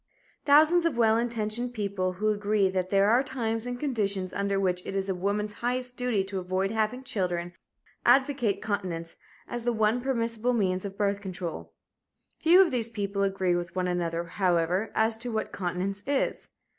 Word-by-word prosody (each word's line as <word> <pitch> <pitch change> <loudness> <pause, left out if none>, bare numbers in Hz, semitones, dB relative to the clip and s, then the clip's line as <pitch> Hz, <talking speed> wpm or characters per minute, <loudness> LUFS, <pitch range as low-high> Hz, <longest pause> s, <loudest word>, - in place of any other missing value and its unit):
Thousands 310 +4 +6
of 280 -8 -3
well 225 -2 +4
intentioned 235 +1 -1
people 200 -3 -1
who 210 +4 0
agree 205 -2 +1
that 185 -1 -1
there 200 +1 +4
are 245 +3 +5
times 235 -4 -2
and 245 0 -4
conditions 200 -9 -1
under 200 0 0
which 180 -2 0
it 195 - -5
is 195 0 -1
woman's 205 +3 -1
highest 250 +1 -2
duty 245 -6 0
to 195 0 -4
avoid 185 +2 -1
having 220 +4 -1
children 175 -6 -2 0.5
advocate 255 -4 +3
continence 180 -6 -3 0.3
as 240 -1 -4
the 240 - +1
one 220 +1 +1
permissible 235 -2 0
means 185 -4 0
of 195 0 -6
birth 200 -1 0
control. 175 - -6 0.7
Few 340 +3 +6
of 360 -4 +3
these 235 -2 0
people 200 -3 -3
agree 190 -2 +1
with 175 0 -4
one 185 -1 0
another, 170 -1 -1
however, 180 +2 0
as 220 0 +2
to 235 +2 -3
what 220 -1 -2
continence 190 +2 -3
is. 280 -1 -1
205 Hz, 170 wpm, -28 LUFS, 185-240 Hz, 0.7 s, Thousands